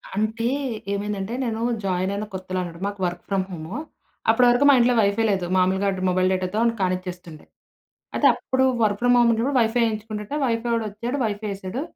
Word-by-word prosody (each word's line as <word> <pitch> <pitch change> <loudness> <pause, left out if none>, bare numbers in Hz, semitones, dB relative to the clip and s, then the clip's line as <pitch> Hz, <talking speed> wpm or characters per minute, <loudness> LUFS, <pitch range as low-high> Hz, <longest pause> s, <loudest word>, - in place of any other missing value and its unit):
అంటే 220 +3 -1 0.5
ఏమైందంటే 200 +1 -3
నేను 225 -2 -2 0.2
జాయిన్ 185 0 0
అయిన 205 +1 -3
కొత్తలో 185 0 -4
అనమాట. 170 -2 -7
మాకు 200 0 -6
వర్క్ 175 0 -4
ఫ్రమ్ 195 -2 0
హోము 170 +2 -7 0.5
అప్పటి 230 +3 +5
వరకు 245 +4 +3
మా - - +8
ఇంట్లో 245 +1 +4
వైఫై 200 +2 +2
లేదు. 190 -3 -1
మామూలుగాడ్ 190 +1 +1
మొబైల్ 185 0 +2
డేటాతో 185 +3 -2 0.2
కానిచ్చేస్తుండే. 180 -3 -4 0.7
అయితే - - +4
అప్పుడు 260 0 0 0.2
వర్క్ 205 -1 +1
ఫ్రమ్ 245 0 +4
హోం 240 -1 +5
ఉన్నప్పుడు 230 +5 0
వైఫై 235 +1 +2
యేయించుకుంటుంటే 215 +2 -4
వైఫై 235 -1 -1
వాడొచ్చాడు 230 +3 -2
వైఫై 210 0 -3
ఏసాడు. 195 +6 -5
205 Hz, 165 wpm, -23 LUFS, 185-230 Hz, 0.7 s, మా